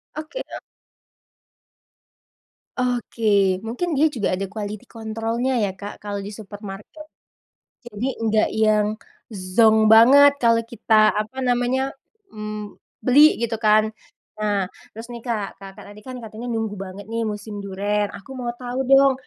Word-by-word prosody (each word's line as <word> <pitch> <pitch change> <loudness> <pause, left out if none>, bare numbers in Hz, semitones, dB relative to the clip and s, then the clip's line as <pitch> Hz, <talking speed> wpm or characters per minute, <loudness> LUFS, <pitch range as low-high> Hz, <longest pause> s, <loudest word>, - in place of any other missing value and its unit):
Oke, 310 +12 -6
Kak. - - -8 2.2
Oke, 215 -6 +1
mungkin 250 +11 -3
dia 305 +2 +3
juga 230 -10 -2
ada 190 +1 -3
quality 210 -1 -6
control-nya 225 +3 -3
ya, 205 - +1
Kak, 205 0 -7
kalau 205 -1 -4
di 205 - -7
supermarket, 205 +7 -10 0.8
jadi 230 +2 -4 0.2
nggak 215 0 +2
yang 210 -1 +3 0.7
zonk 220 -1 +6
banget. 275 +6 +8
Kalau 230 0 +5
kita, 215 -2 +3
apa 215 +5 -3
namanya, 255 +2 0 0.4
mmm, 210 -1 -6 0.3
beli 290 +5 +6
gitu 235 -1 -1
kan. 215 0 +6 0.5
Nah, 205 -3 0 0.2
terus 225 +2 -9
nih, 240 -1 -9
Kak, 220 -5 -3
Kakak 195 +1 -11
tadi 205 +1 -13
kan 255 -1 -8
katanya 220 +2 -8
nunggu 225 -2 -2
banget 195 0 -8
nih 230 0 -1
musim 210 0 -5
duren, 205 +1 -1
aku 200 +7 -11
mau 240 -1 -2
tahu 250 +1 -4
dong 270 0 +7
220 Hz, 135 wpm, -22 LUFS, 205-245 Hz, 2.2 s, banget